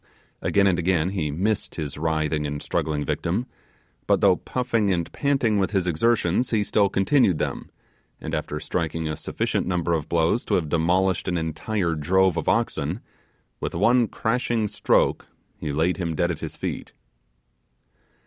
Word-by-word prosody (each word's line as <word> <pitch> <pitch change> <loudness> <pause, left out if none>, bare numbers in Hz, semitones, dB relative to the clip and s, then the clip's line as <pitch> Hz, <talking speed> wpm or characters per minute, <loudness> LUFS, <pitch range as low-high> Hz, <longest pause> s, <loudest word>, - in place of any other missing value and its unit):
Again 100 0 +2
and 95 -3 +3
again 90 -1 +1
he 85 -6 -1
missed 95 +8 -1
his 75 -4 -4
writhing 80 -1 -1
and 75 0 -4
struggling 75 0 -2
victim, 95 +9 -1 0.6
but - - +4
though - - +5
puffing 115 -5 -1
and 85 -3 -1
panting 135 -7 +1
with 95 - +1
his 95 -4 0
exertions, 95 +5 +1
he 110 -2 +1
still 100 -1 +2
continued 95 - +3
them; - - -3 0.5
and - - -6
after - - -2
striking 80 -2 -2
a 75 - -2
sufficient - - -2
number 85 -2 0
of 80 -3 -2
blows 85 +7 +2
to - - +1
have 80 -4 0
demolished 90 +3 +1
an 90 - 0
entire 85 +3 -1
drove 90 +4 +2
of - - -1
oxen, 90 -5 0 0.6
with - - -4
one 120 -1 +4
crashing 115 -1 0
stroke - - +1 0.3
he 75 - -3
laid 80 +5 +1
him 85 -4 -2
dead 85 +2 +1
at 80 - -5
his - - -6
feet. - - -5
90 Hz, 160 wpm, -24 LUFS, 80-105 Hz, 0.6 s, though